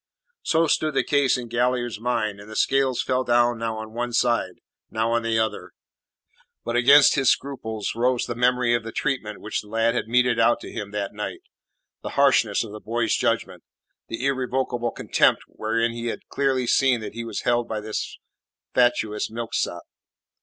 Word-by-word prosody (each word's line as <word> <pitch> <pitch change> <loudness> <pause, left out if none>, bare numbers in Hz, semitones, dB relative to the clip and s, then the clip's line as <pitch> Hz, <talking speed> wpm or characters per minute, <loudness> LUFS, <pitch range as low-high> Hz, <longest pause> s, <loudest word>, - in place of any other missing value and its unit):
So 165 0 +2
stood 155 -1 0
the - - +3
case 140 -4 +2
in 120 -1 -6
Galliard's 120 -1 -1
mind, 115 -4 -1
and 105 +1 -12
the 110 - -9
scales 135 -2 +1
fell 130 0 0
now 120 -2 +1
on 110 0 -8
one 120 +1 -3
side, 120 0 +1 0.3
now 110 +1 -1
on 120 0 +2
the 115 0 0
other. 110 0 -2 0.9
But 120 - -2
against 140 +4 +7
his 135 -2 +3
scruples 110 -6 -2
rose 125 +1 +1
the 120 - -4
memory 125 0 +2
of 120 -1 0
the 115 - -6
treatment 120 -7 -3
which 105 - -3
the 105 - -17
lad 115 +2 +1
had 120 - -2
meted 125 0 +2
out 115 +1 +4
to - - -9
him 105 -3 -5
that 100 -1 -4
night; 105 0 -5 0.6
the - - -5
harshness 125 -7 +3
of 110 - -9
the 105 - -8
boy's 115 +2 -1
judgment; - - -1 0.4
the 115 +3 -4
irrevocable 130 -2 -1
contempt - - +2
wherein 115 +2 -1
he 115 0 -5
had - - -5
clearly 135 -2 0
seen 130 0 +3
that 110 - -7
he 115 +1 -5
was 115 -3 -4
held 120 0 +1
by 110 - -3
this 110 0 -5 0.6
fatuous 120 -4 +1
milksop. 115 +1 -3
120 Hz, 180 wpm, -24 LUFS, 110-125 Hz, 0.9 s, against